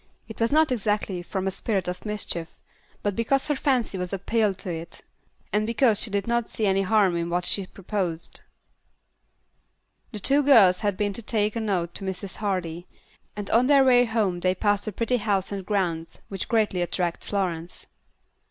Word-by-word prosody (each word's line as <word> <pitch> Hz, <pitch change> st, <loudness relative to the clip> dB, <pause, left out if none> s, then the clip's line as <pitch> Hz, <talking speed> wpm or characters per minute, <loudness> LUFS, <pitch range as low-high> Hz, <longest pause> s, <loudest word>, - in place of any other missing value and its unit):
It 220 Hz, -, -10 dB
was 230 Hz, +2 st, +1 dB
not 310 Hz, -1 st, +4 dB
exactly 210 Hz, -5 st, -1 dB
from 190 Hz, +2 st, -4 dB
a 195 Hz, -, 0 dB
spirit 195 Hz, -1 st, -2 dB
of 180 Hz, +4 st, -5 dB
mischief, 190 Hz, -5 st, -2 dB, 0.6 s
but 205 Hz, -2 st, 0 dB
because 265 Hz, +4 st, +1 dB
her 295 Hz, -, +2 dB
fancy 250 Hz, -8 st, 0 dB
was 180 Hz, 0 st, -4 dB
appealed 200 Hz, 0 st, 0 dB
to, 170 Hz, -4 st, -5 dB, 0.7 s
and 210 Hz, +1 st, +1 dB
because 230 Hz, -2 st, +3 dB
she 235 Hz, -, -1 dB
did 200 Hz, -1 st, -1 dB
not 235 Hz, -1 st, 0 dB
see 220 Hz, -, -2 dB
any 195 Hz, 0 st, +3 dB
harm 195 Hz, -2 st, +3 dB
in 170 Hz, 0 st, -2 dB
what 175 Hz, +1 st, -1 dB
she 195 Hz, +1 st, +1 dB
proposed. 185 Hz, -4 st, -4 dB, 1.7 s
The 220 Hz, -, -6 dB
two 270 Hz, +8 st, +2 dB
little 285 Hz, -1 st, +5 dB
girls 185 Hz, -5 st, +6 dB
had 205 Hz, -3 st, -1 dB
been 205 Hz, -1 st, 0 dB
to 235 Hz, -, -5 dB
take 210 Hz, -1 st, 0 dB
a -, -, -1 dB
note 185 Hz, -6 st, -1 dB
to -, -, -7 dB
Mrs. 190 Hz, 0 st, -4 dB
Hardy, 180 Hz, -4 st, -3 dB, 0.5 s
and 205 Hz, -1 st, -5 dB
on 240 Hz, +3 st, +4 dB
their 280 Hz, -1 st, +6 dB
way 245 Hz, -2 st, +5 dB
home 215 Hz, -6 st, 0 dB
they 185 Hz, +1 st, +1 dB
passed 205 Hz, +2 st, 0 dB
a -, -, -1 dB
pretty 230 Hz, +5 st, 0 dB
house 205 Hz, -4 st, 0 dB
and 200 Hz, -1 st, -4 dB
grounds 175 Hz, -5 st, -2 dB
which 195 Hz, -2 st, -4 dB
greatly 215 Hz, -5 st, +1 dB
attracted 175 Hz, 0 st, -2 dB
Florence. 180 Hz, -4 st, -3 dB
200 Hz, 185 wpm, -25 LUFS, 180-225 Hz, 1.7 s, girls